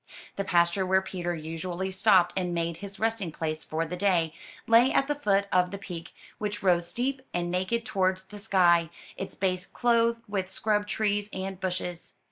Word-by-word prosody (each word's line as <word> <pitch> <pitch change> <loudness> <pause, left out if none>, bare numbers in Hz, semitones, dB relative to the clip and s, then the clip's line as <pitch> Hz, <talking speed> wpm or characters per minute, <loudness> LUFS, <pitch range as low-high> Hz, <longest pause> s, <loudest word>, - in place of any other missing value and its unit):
The 200 - -1
pasture 170 +1 +2
where 190 +1 +2
Peter 175 -2 -3
usually 170 +4 -4
stopped 185 -2 +4
and 180 -2 -1
made 170 -1 -1
his 200 +2 -8
resting 225 -6 0
place 155 0 -3
for 160 +1 -2
the 170 +3 -5
day, 175 -4 +1 0.3
lay 235 +3 +6
at 275 - +2
the 295 - +1
foot 200 -9 +1
of 180 -1 +3
the 200 - -5
peak, 175 -4 -8 0.3
which 210 -1 -3
rose 175 -2 +3
steep 260 +2 -1
and 175 0 -1
naked 190 +6 -1
towards 190 -3 0
the 205 +2 -11
sky, 175 -5 +4 0.3
its 190 - -6
base 185 0 -1
clothed 235 -1 +2
with 195 -2 -2
scrub 210 +1 0
trees 205 -1 0
and 190 0 -5
bushes. 180 -2 -3
190 Hz, 180 wpm, -28 LUFS, 175-205 Hz, 0.3 s, lay